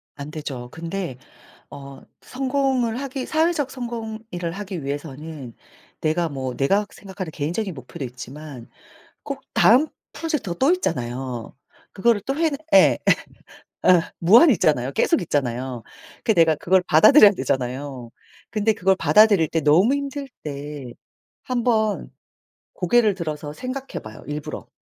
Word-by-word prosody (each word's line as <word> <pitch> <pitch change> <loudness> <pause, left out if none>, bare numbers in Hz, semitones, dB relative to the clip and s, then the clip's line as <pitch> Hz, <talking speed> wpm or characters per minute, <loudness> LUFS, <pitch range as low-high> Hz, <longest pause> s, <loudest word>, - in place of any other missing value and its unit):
안 140 +1 -8
되죠. 135 -6 -6
근데 165 -3 -5 0.5
어 140 -1 -10 0.2
성공을 260 -2 -1
하기 270 -1 -4
사회적 315 -3 0
성공 235 -4 -5
일을 175 -1 -3
하기 190 -3 -6
위해서는 145 -2 -6 0.5
내가 165 +2 0
뭐 130 -3 -4
내가 195 +10 +2
생각하는 190 -4 -8
개인적인 175 +7 -3
목표도 135 +2 -8
있지만 130 +1 -9 0.5
꼭 - - -6
다음 260 +8 +5 0.3
프로젝트가 305 - -3
또 270 - +4
있잖아요. 125 - -3 0.4
그거를 225 +1 +2
또 270 - -2
해 325 0 +2
내 285 - -3 0.2
예 290 - +6 0.9
어 180 -2 +6 0.2
무한히 230 - +7
있잖아요. 135 -6 +1
계속 - - +2
있잖아요. 130 -6 -2 0.4
그 220 - +4
내가 165 -4 +4
그걸 180 +4 +2
받아들여야 215 - +8
되잖아요. 130 -5 -3 0.4
근데 215 0 +1
그걸 190 -1 +2
받아들일 180 +1 +5
때 165 - 0
너무 175 - +4
힘들 280 0 -4 0.2
때 145 -3 -6 0.5
한번 230 -4 0 0.6
고개를 240 - +2
들어서 150 -4 -5
생각해 260 - -6
봐요, 110 0 -11
일부러. 150 0 -6
170 Hz, 290 characters per minute, -22 LUFS, 140-235 Hz, 0.9 s, 받아들여야